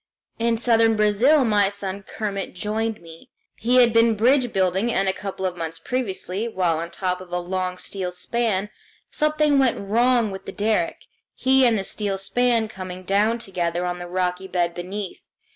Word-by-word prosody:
In 230 0 +1
southern 225 -1 +3
Brazil 225 +8 +4
my 205 -3 +3
son 200 -1 -6
Kermit 200 -1 -5
joined 215 +2 -2
me. 165 -1 -14 0.3
He 245 +3 +2
had 240 -2 +6
been 230 0 +4
bridge 245 +3 +3
building, 190 +4 +1
and 195 -2 +1
a 190 - +2
couple 190 -1 -5
of 180 -1 -1
months 165 -1 -5
previously, 205 0 -3
while 180 -7 0
on 170 +1 -4
top 180 0 -3
of 180 -1 -12
a 180 - -1
long 180 +1 -3
steel 185 -1 -4
span, 210 +1 -1 0.4
something 305 -1 +2
went 260 -3 +2
wrong 230 +2 +2
with 195 0 -8
the - - -6
derrick, 215 +1 -1 0.3
he 265 0 +4
and 230 -2 +2
the 195 - -2
steel 200 0 -2
span 235 +3 +1
coming 185 -3 -8
down 205 +5 +2
together 175 -5 -2
on 180 0 -3
the 175 - -6
rocky 180 +1 -2
bed 175 -2 0
beneath. 185 +2 -6
200 Hz, 175 wpm, -23 LUFS, 185-230 Hz, 0.4 s, had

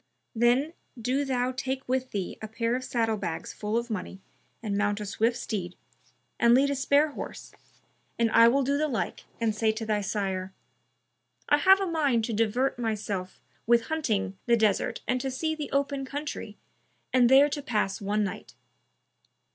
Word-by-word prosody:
Then 245 +7 +2 0.3
do 255 +5 0
thou 255 -2 0
take 265 +1 -4
with 260 0 -1
thee 195 -3 -4
a 215 - -5
pair 230 +2 -1
of 255 - -3
saddle 225 -3 0
bags 170 -5 -4
full 210 +2 -2
of 235 0 -3
money 190 -2 -5 0.4
and 205 -3 -2
mount 205 0 0
a 210 - -4
swift 225 +4 0
steed, 180 -7 -4 0.6
and 235 0 +6
lead 280 +2 +3
a - - 0
spare 280 +3 +3
horse, - - -8 0.6
and 230 -1 +2
I 230 +1 +7
will 270 +4 +3
do 280 +2 0
the 305 - +1
like, 245 -6 -3
and 225 -2 +1
say 220 +1 +2
to 220 +1 -5
thy 210 -1 0
sire, 190 -2 -3 1.0
'I 290 - +6
have 385 +4 +6
a 390 - 0
mind 285 -10 +1
to 230 - -3
divert 230 +4 +1
myself 205 -5 -3 0.3
with 235 0 +3
hunting 210 -11 -1
the 235 -1 +5
desert 220 +2 +1
and 255 0 0
to 270 - -2
see 315 +5 -2
the 305 -2 -5
open 280 0 0
country 290 +3 -6 0.6
and 250 -2 +5
there 275 +2 +7
to 290 0 -3
pass 210 -8 -1
one 210 +1 0
night.' 195 - -6
235 Hz, 180 wpm, -27 LUFS, 210-270 Hz, 1.0 s, I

